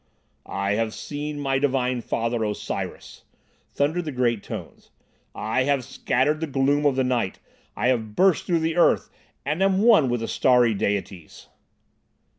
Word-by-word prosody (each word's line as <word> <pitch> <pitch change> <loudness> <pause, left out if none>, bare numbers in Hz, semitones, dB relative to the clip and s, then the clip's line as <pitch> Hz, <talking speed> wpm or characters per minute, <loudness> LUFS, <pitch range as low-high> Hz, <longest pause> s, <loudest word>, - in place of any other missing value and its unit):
"I 100 0 -2
have 110 +1 -1
seen 145 0 -5
my 135 -1 0
divine 130 -3 0
Father, 115 0 -2
Osiris," 105 -1 -5 0.5
thundered 160 +5 -1
the 155 - -3
great 120 -4 0
tones. - - -9 0.5
"I 120 +4 0
have 140 -2 +1
scattered 140 +2 0
the 160 - -3
gloom 145 +1 +2
of 140 - +1
the 130 - +1
night. 120 -7 -1 0.4
I 120 +4 +1
have 110 -4 -1
burst 185 -4 +3
through 170 -2 +1
the 165 +1 -1
earth, 175 - +3 0.3
and 150 +6 -1
am 195 +1 +3
one 215 - +5
with 120 -1 -1
the 115 - -3
starry 125 -3 +3
Deities!" 100 -4 -4
130 Hz, 155 wpm, -24 LUFS, 115-150 Hz, 0.5 s, one